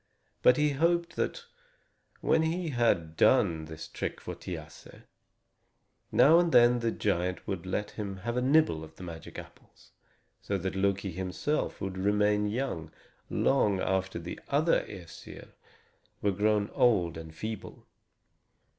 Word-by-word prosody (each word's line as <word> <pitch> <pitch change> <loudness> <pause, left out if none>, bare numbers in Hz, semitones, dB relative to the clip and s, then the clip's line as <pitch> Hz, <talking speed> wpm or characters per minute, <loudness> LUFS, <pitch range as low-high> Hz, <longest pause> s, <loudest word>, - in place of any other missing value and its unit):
But 125 - +6
he 150 0 +3
hoped 170 +3 +1
that, 480 - -2 0.8
when 160 - +3
he 165 +1 -1
had 115 - +1
done 85 -8 +3
this 80 0 -8
trick - - -4
for - - -6
Thiasse, 80 -4 -9 1.1
now 160 +4 +6
and 175 -1 +2
then 120 -1 +6
the 115 -1 0
giant 90 -4 -1
would 95 -2 -4
let 105 +2 -2
him 100 -3 -5
have 120 0 -1
a 125 - +1
nibble 135 - +3
of 80 0 -12
the 90 - -11
magic 80 -3 -9
apples; - - -14 0.5
so 100 - -2
that 95 +1 -3
Loki 100 0 0
himself 95 - -2
would 95 -1 -4
remain 105 +1 +2
young 105 - -3 0.4
long 105 -8 +2
after 95 0 -1
the 85 +1 -7
other 155 +4 +3
Æsir 90 -5 -11 0.7
were 100 - +1
grown 105 +1 +1
old 90 -9 +2
and 80 -1 -9
feeble. 110 +3 -7
100 Hz, 140 wpm, -29 LUFS, 90-125 Hz, 1.1 s, But